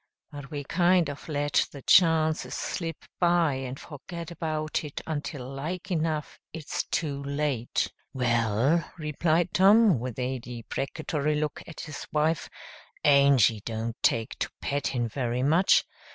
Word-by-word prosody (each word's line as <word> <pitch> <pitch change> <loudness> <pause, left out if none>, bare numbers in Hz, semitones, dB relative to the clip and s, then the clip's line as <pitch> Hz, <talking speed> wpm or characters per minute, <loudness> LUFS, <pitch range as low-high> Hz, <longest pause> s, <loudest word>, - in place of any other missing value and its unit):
But 145 -2 -9
we 145 -2 -4
kind 175 +1 +3
of 145 - -11
let 145 -1 +1
the 140 -3 -10
chances 160 -2 +4
slip 165 -3 -4
by 175 -4 +3
and 130 0 -5
forget 170 +3 -8
about 155 -2 -2
it 150 -2 -6
until 145 -4 -4
like 165 +8 -5
enough 155 -3 -1
it's 155 -3 -3
too 145 -4 -2
late." 140 -4 -1 0.2
"Well," 120 +5 +2
replied 160 +2 +1
Tom, 200 - +6
with 125 -1 -5
a 130 0 -2
deprecatory 140 +5 -3
look 150 0 -2
at 165 - -8
his 155 -2 -7
wife, 155 +1 +1 0.5
"Angy 140 -7 +5
don't 115 0 -3
take 115 -1 +1
to - - -1
pettin' 135 -4 -1
very 120 +2 -2
much. 165 +7 +4
145 Hz, 135 wpm, -27 LUFS, 130-165 Hz, 0.5 s, Tom